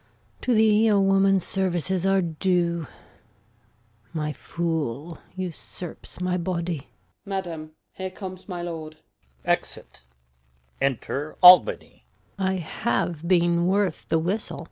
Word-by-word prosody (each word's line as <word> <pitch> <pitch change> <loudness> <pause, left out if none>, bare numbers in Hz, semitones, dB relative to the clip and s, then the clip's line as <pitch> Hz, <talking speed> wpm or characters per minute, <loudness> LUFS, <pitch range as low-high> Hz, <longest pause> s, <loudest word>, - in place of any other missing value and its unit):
To 250 - +1
thee 220 0 +5
a 205 -2 +4
woman's 195 -1 +4
services 185 -1 0
are 195 -1 +3
due; 170 -1 0 1.3
My 150 -2 -2
fool 160 -2 -3 0.2
usurps 180 -1 -7
my 180 0 0
body. 170 -2 -2
Osw. 90 - -25
Madam, 170 -5 -4 0.2
here 190 0 -5
comes 185 0 -9
my 175 -2 -4
lord. 160 -2 -6 0.5
Exit. - - -2 0.8
Enter 140 +2 -2
Albany. 180 0 +7
175 Hz, 85 wpm, -25 LUFS, 160-190 Hz, 1.3 s, Albany